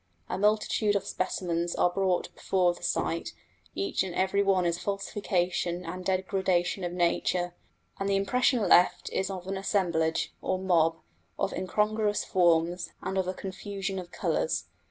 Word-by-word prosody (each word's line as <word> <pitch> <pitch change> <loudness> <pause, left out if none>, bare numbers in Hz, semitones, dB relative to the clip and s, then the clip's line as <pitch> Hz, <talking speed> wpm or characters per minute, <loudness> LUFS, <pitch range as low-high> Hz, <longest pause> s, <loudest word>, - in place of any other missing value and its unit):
A - - -1
multitude 210 0 +2
of 200 - 0
specimens 175 -2 -2
are 180 - +3
brought 185 -1 0
before 180 -2 +1
the - - -14
sight, 170 -1 -1 0.4
each 100 0 0
and 185 -2 -3
every 190 +2 +2
one 195 -2 +3
a 170 - +2
falsification 180 -2 -1
and 180 +2 -5
degradation 190 -1 0
of 175 - -2
nature, 175 0 0 0.5
and 195 0 -1
the 200 - +2
impression 240 +2 +2
left 175 0 +4
is 190 - 0
of 185 -2 -5
an 195 +1 -3
assemblage, 170 -5 0
or 185 - 0
mob, 170 -3 +3 0.4
of - - -1
incongruous 210 +3 0
forms, 170 -1 +2
and 190 - -3
of 190 -1 0
a 185 - -2
confusion 195 0 -4
of 175 -1 -8
colours. 480 - 0
185 Hz, 155 wpm, -28 LUFS, 175-195 Hz, 0.5 s, left